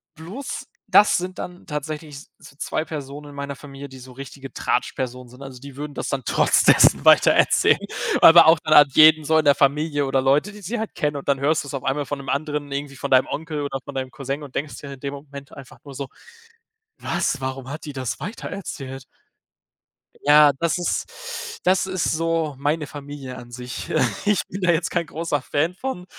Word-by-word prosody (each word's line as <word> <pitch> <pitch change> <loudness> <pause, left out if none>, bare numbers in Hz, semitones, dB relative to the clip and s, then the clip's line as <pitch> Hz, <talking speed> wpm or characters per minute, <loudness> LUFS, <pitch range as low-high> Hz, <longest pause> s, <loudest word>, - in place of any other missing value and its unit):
Bloß, 195 - -7 0.2
das 210 - +5
sind 185 +1 -5
dann 180 0 -8
tatsächlich 150 -1 -5 0.2
so 140 - -16
2 155 +2 -2
Personen 145 -1 -7
in 140 - -12
meiner 140 0 -5
Familie, 140 0 -10
die 130 0 -12
so 130 0 -12
richtige 135 +1 -10
Tratschpersonen 125 -1 -2
sind. 125 +2 -15
Also 130 -2 -10
die 140 0 -11
würden 145 0 -6
das - - -4
dann 135 -2 -2
trotz - - +3
dessen - - +5
weiter - - +7
erzählen, - - +4 0.4
aber 165 0 +9
auch 160 0 +6
dann 155 -1 0
an 145 -1 +8
jeden 155 0 +7
so 160 +2 +2
in 155 - 0
der 145 -1 +6
Familie 145 +1 +1
oder 135 0 +1
Leute, 140 +9 +2
die 210 0 -13
sie 215 +6 -4
halt 220 - -4
kennen 145 -1 -1
und 140 - -8
dann 140 - +2
hörst 150 +3 +1
du's 140 -1 -9
auf 135 - -4
einmal 140 +2 -1
von 145 - -4
'nem 135 - -8
anderen 145 0 -2
irgendwie 140 0 -4
von - - -4
deinem 130 0 +5
Onkel 155 -1 -4
oder 135 -1 -3
von - - -9
deinem 130 -1 -3
Cousin 140 +1 -5
und 135 - -12
denkst 145 +1 -4
dir 140 -1 -9
in 135 - -12
dem 140 0 -5
Moment 140 0 -11
einfach 135 -2 -12
nur 140 -2 -11
so: 135 0 -5 0.9
„Was?“ 140 - -1
Warum 130 0 -5
hat 150 +3 -7
die 145 - -6
das 130 -3 -4
weiter 210 +5 -6
erzählt? 135 -9 -7 1.2
Ja, 150 0 +6
das 170 +1 +1
ist 470 - -4
das 185 +1 +3
ist 185 -3 -2
so 165 -2 -1
meine 150 +2 0
Familie 140 -3 -8
an 120 -1 -12
sich. 125 0 -7 0.4
ich 210 -2 +3
bin 195 +1 -6
da 180 - +3
jetzt 165 0 0
kein 170 -2 0
großer 155 -3 -3
Fan 155 +6 -1
von, 190 -4 -5
145 Hz, 210 wpm, -22 LUFS, 135-160 Hz, 1.2 s, aber